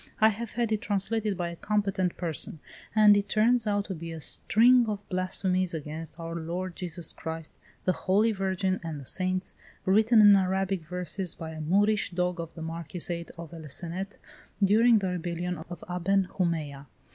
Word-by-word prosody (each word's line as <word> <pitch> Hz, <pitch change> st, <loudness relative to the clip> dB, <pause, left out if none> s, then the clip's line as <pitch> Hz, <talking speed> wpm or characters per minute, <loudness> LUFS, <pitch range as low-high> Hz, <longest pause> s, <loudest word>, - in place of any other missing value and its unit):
I 220 Hz, -, +7 dB
have 220 Hz, +1 st, -5 dB
had 235 Hz, -1 st, -1 dB
it 215 Hz, -1 st, 0 dB
translated 205 Hz, 0 st, -1 dB
by 175 Hz, -2 st, -2 dB
a 170 Hz, -, -7 dB
competent 195 Hz, -2 st, -1 dB
person, 165 Hz, -2 st, -2 dB, 0.4 s
and 210 Hz, -1 st, +7 dB
it 200 Hz, 0 st, 0 dB
turns 225 Hz, +1 st, +3 dB
out 205 Hz, -1 st, +1 dB
to 195 Hz, -, -4 dB
be 165 Hz, -1 st, -7 dB
a 165 Hz, -, -6 dB
string 240 Hz, -, +4 dB
of 205 Hz, -1 st, -4 dB
blasphemies 185 Hz, -1 st, 0 dB
against 160 Hz, +1 st, -7 dB
our 165 Hz, 0 st, -5 dB
Lord 170 Hz, +2 st, -4 dB
Jesus 175 Hz, -2 st, -1 dB
Christ, 160 Hz, 0 st, -7 dB, 0.3 s
the 185 Hz, -, +4 dB
Holy 200 Hz, +5 st, +2 dB
Virgin, 190 Hz, -1 st, -1 dB
and 160 Hz, -3 st, -5 dB
the 135 Hz, -, -10 dB
Saints, 185 Hz, +4 st, -1 dB, 0.3 s
written 220 Hz, +4 st, +5 dB
in 205 Hz, -1 st, +9 dB
Arabic 190 Hz, -1 st, +1 dB
verses, 180 Hz, +2 st, -2 dB
by 160 Hz, -1 st, -7 dB
a 155 Hz, 0 st, -7 dB
Moorish 205 Hz, +6 st, +2 dB
dog 180 Hz, 0 st, -1 dB
of 165 Hz, -1 st, -6 dB
the 165 Hz, -, -7 dB
Marquisate 170 Hz, +1 st, -3 dB
of 170 Hz, 0 st, -9 dB
El 160 Hz, -3 st, -9 dB
Cenet, 180 Hz, +7 st, -2 dB, 0.5 s
during 225 Hz, +4 st, +5 dB
the 195 Hz, -3 st, -1 dB
rebellion 175 Hz, 0 st, -3 dB
of 175 Hz, -2 st, -8 dB
Aben 180 Hz, +2 st, +1 dB
Humeya. 155 Hz, -6 st, -2 dB
185 Hz, 175 wpm, -28 LUFS, 170-205 Hz, 0.5 s, in